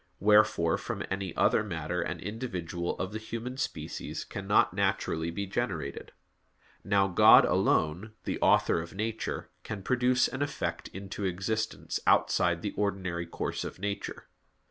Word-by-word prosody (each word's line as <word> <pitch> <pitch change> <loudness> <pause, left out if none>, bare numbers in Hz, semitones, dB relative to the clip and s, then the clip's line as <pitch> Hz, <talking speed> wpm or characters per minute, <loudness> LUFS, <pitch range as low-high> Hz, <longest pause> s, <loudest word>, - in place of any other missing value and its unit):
Wherefore 105 -5 +4
from - - -4
any 95 -1 -2
other - - +3
matter 85 -3 -3
an 90 - -3
individual 90 -6 -4
of 95 - -3
the 110 - -4
human 115 +3 -5
species 80 - -4
cannot - - +1
naturally 80 +1 0
be 100 +4 -3
generated. 95 - -3 0.7
Now 100 -1 +3
God 90 - +7
alone, 90 +8 +1
the - - -3
Author - - +4
of 85 +3 -9
nature, 110 +2 -3
can 100 -3 -6
produce 125 +2 +3
an 130 - -5
effect 145 0 -2
into 100 +1 -6
existence 105 +5 -2
outside 85 -1 +3
the 105 - -2
ordinary 95 -4 -2
course - - -3
of - - -6
nature. 100 +1 -4
95 Hz, 140 wpm, -29 LUFS, 85-110 Hz, 0.7 s, God